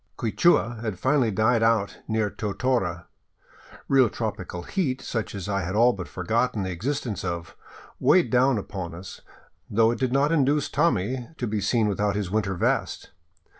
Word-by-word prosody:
Quichua 120 -1 +2
had 110 -5 -3
finally 130 +2 +2
died 110 +3 +2
out 115 -3 +1
near 110 -2 0
Totora. 100 -5 -1 0.8
Real 130 -4 +4
tropical 100 -6 -5
heat, 135 - -1
such 115 -5 -4
as 100 -1 -5
I 100 -1 -1
had 95 +2 -3
all 120 +3 +5
but 90 -3 -7
forgotten 110 +3 -1
the 95 - -3
existence 120 - -3
of, 85 -2 -4 0.4
weighed 185 - +4
down 130 0 +3
upon 95 -4 -5
us, 90 +2 -10 0.5
though 115 +2 +3
it 120 - -4
did 130 -2 0
not 140 +3 +2
induce 145 -2 +2
Tommy 125 - 0
to 125 - -2
be 105 -2 -2
seen 110 +2 +2
without 100 0 0
his 100 -3 -3
winter 100 -3 0
vest. - - -1
110 Hz, 165 wpm, -25 LUFS, 100-125 Hz, 0.8 s, all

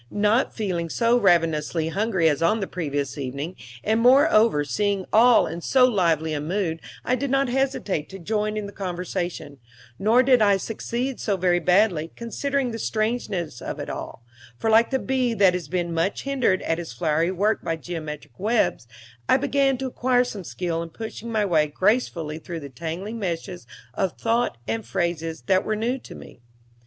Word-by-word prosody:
Not 210 +4 +2
feeling 180 -6 -3
so 230 +6 +2
ravenously 165 -5 +2
hungry 195 -2 +1
as 150 -1 +1
on 190 +7 +3
the 195 - -1
previous 145 -6 -3
evening, 140 +6 -4 0.3
and, 220 +2 +2
moreover, 235 - +5
seeing 200 +5 0
them - - -13
all 235 +2 +6
in 170 - -5
so 255 +7 +4
lively 165 -9 +1
a 145 - -2
mood, 165 0 -2 0.2
I 250 - +1
did 275 +2 -2
not 275 0 +2
hesitate 250 - -1
to 195 - -8
join 210 +3 -2
in 210 - -3
the 200 - -7
conversation: 180 -6 -4 0.4
nor 225 +5 +4
did 250 -2 +4
I 200 -2 +5
succeed 235 +5 -3
so 200 -3 0
very 175 -1 +2
badly, 180 -2 +2
considering 265 +2 -2
the 225 - -5
strangeness 215 - -2
of - - -5
it - - -5
all; 115 - -7 0.3
for 225 - 0
like 225 +1 +5
the 265 - +1
bee 255 -3 0
that 195 -4 +5
has 180 -4 -4
been 175 0 -2
much 165 +4 -1
hindered 255 -9 +1
at 165 +1 -1
his 170 -6 -6
flowery 155 +6 0
work 200 +4 0
by 165 - -1
geometric 155 -5 -7
webs, 215 - +1 0.4
I - - +6
began 275 -1 +1
to 265 - -4
acquire 250 -1 +2
some 210 -6 -6
skill 170 -1 -3
in 170 - -6
pushing 225 +4 -7
my 215 -2 +1
way 160 -5 +2
gracefully 165 -3 0
through 165 0 -7
the 140 - -8
tangling 170 - -5
meshes 175 - -4 0.3
of 190 +4 -1
thought 230 - 0
and 110 0 -2
phrases 165 +6 -2
that 190 -1 +2
were 215 - -1
new 240 +5 -1
to - - -12
me. - - -13
190 Hz, 185 wpm, -24 LUFS, 165-230 Hz, 0.4 s, all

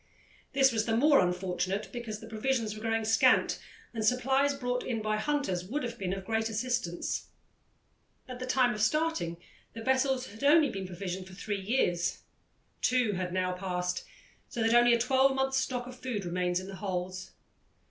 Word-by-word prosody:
This 270 -1 +5
was 220 -1 0
the 225 0 +2
more 290 +3 +6
unfortunate 185 +3 -1
because 230 -4 -5
the 225 - -9
provisions 225 0 -1
were 215 - -9
growing 225 0 0
scant, 225 +1 +4 0.3
and 225 -2 -2
supplies 265 +4 +2
brought 250 -2 -2
in 235 -3 -2
by 215 0 0
hunters 215 -8 -1
would 255 +11 -3
have 235 -1 -5
been 185 -2 -2
of 195 0 -4
great 225 +1 0
assistance. 225 -6 -2 1.0
At 250 -1 -7
the 255 - -5
time 255 -1 +3
of 210 - -4
starting, 260 - +1 0.4
the 225 - -7
vessels 260 0 +2
had 220 +4 -11
only 295 0 +5
been 195 -1 -5
provisioned 185 +1 -5
for 185 - -12
three 200 0 -3
years. 190 -5 0 0.6
Two 250 -3 +2
had 185 -2 -3
now 185 0 0
passed, 180 -1 -2 0.5
so 240 -4 -2
that 225 +1 +3
only 240 0 +6
a - - -1
twelvemonth's 265 +2 +2
stock 250 -2 -1
of 250 0 -10
food 225 -7 -3
remained 180 0 0
in 185 - -3
the 195 0 -8
holds. 185 -1 -4
225 Hz, 180 wpm, -30 LUFS, 190-255 Hz, 1.0 s, more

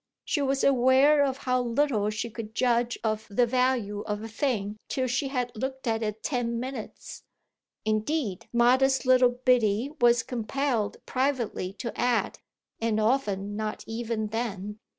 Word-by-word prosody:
She 295 - 0
was 275 0 0
aware 275 +3 +5
of 270 -2 0
how 255 -2 0
little 235 -3 +1
she 220 +2 -4
could 220 -1 -8
judge 240 -1 +1
of 215 -1 -1
the 225 +4 +3
value 240 -4 0
of 210 0 -3
a - - -5
thing 215 -3 -2
till 260 - 0
she 255 +3 0
had 250 -3 -2
looked 265 +3 -4
at 225 -1 0
it 215 0 -3
ten 235 -3 -1
minutes; 255 -3 -7 0.6
indeed 215 - -1
modest 260 +3 +3
little 255 -1 +6
Biddy 245 -1 +1
was 240 -1 +5
compelled 245 -1 -1
privately 255 -8 -1
to 230 +3 -6
add 245 -2 0 0.4
"And 225 -1 0
often 205 -4 0
not 215 0 -4
even 225 -1 -3
then." 210 -2 -4
240 Hz, 150 wpm, -27 LUFS, 215-260 Hz, 0.6 s, little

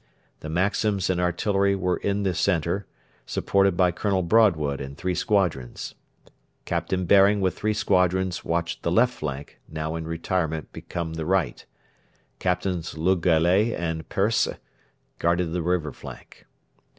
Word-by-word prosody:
The 80 - -7
Maxims 95 +3 +1
and 90 -1 0
artillery 100 +3 +1
were 90 -1 0
in 100 0 -1
the 95 -2 +1
centre, 90 +2 0 0.4
supported 100 -2 +1
by 90 -2 +4
Colonel 95 +1 0
Broadwood 85 -8 +3
and 70 +1 -7
three 90 +5 -1
squadrons. 90 - -1 0.7
Captain 95 -1 -1
Baring 100 +2 +5
with 95 -2 0
three 105 0 -1
squadrons 95 -3 +1
watched 85 0 -2
the 85 - -1
left 125 +7 +3
flank, 70 -1 -6
now 80 0 -4
in 80 -1 -5
retirement 80 -1 -2
become 85 -2 -5
the 80 -1 -4
right. 95 -2 0 0.8
Captains 90 -2 -2
Le 90 +4 +3
Gallais 90 +6 +3
and 80 -2 -4
Persse 105 +4 +2 0.7
guarded 85 0 +1
the 90 - -1
river 85 -3 0
flank. - - -12
90 Hz, 140 wpm, -25 LUFS, 80-95 Hz, 0.8 s, Baring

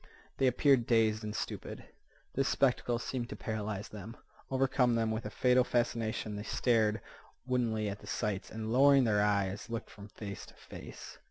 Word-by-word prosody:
They 135 - +3
appeared 130 -1 +3
dazed 110 -2 +3
and 105 0 -4
stupid. - - -5 0.5
This 135 0 +1
spectacle 125 -2 +2
seemed 120 0 -4
to - - -5
paralyze 105 -2 -4
them, 105 +2 -9 0.3
overcome 130 -2 +2
them 115 -1 +1
with 110 +2 -3
a - - -5
fatal 125 0 +3
fascination. 115 -3 -1
They 105 - -4
stared 110 -1 +1 0.4
woodenly 115 -4 0
at 100 0 -4
the - - -13
sights, 105 -4 -2
and, 110 0 -4
lowering 140 +1 +6
their 105 -3 +3
eyes, 100 0 0
looked 115 -1 -5
from 100 0 -11
face 100 -2 -8
to - - -16
face. - - -11
115 Hz, 170 wpm, -32 LUFS, 105-125 Hz, 0.5 s, lowering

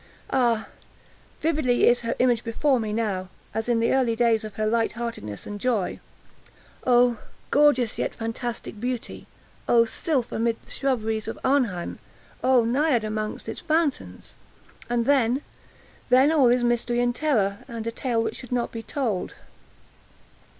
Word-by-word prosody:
Ah, 235 -4 +2 0.8
vividly 300 -6 +2
is 240 0 +4
her 230 0 -2
image 245 -2 +2
before 255 +3 +1
me 215 -2 -3
now, 205 -4 -2 0.2
as 220 +2 -2
in 240 - +3
the 230 - +2
early 250 -4 +2
days 230 -1 +2
of 215 -2 -8
her 215 - -1
light 225 +1 +1
heartedness 230 - -5
and 205 0 -6
joy! 230 -7 0 0.9
Oh, 245 -2 +4 0.3
gorgeous 275 -6 +3
yet - - -2
fantastic 225 -1 -5
beauty! 245 0 -4 0.4
Oh, 230 -1 +6
sylph 255 +1 -2
amid 230 0 0
the - - -11
shrubberies 225 -5 -1
of 225 - -4
Arnheim! 240 -11 0 0.4
Oh, 255 -2 +5
Naiad 255 0 +2
among 215 0 -3
its - - -5
fountains! 315 -2 -1 0.6
And 240 -1 +1
then—then 260 +1 +1
all 290 -6 +5
is 245 0 +3
mystery 240 0 +1
and 245 0 +2
terror, 215 -11 +1
and 230 -2 -6
a 230 - -1
tale 235 -2 -1
which - - -3
should 250 - -10
not 245 -1 -1
be 230 - -5
told. 225 -6 -3
235 Hz, 150 wpm, -25 LUFS, 225-255 Hz, 0.9 s, Oh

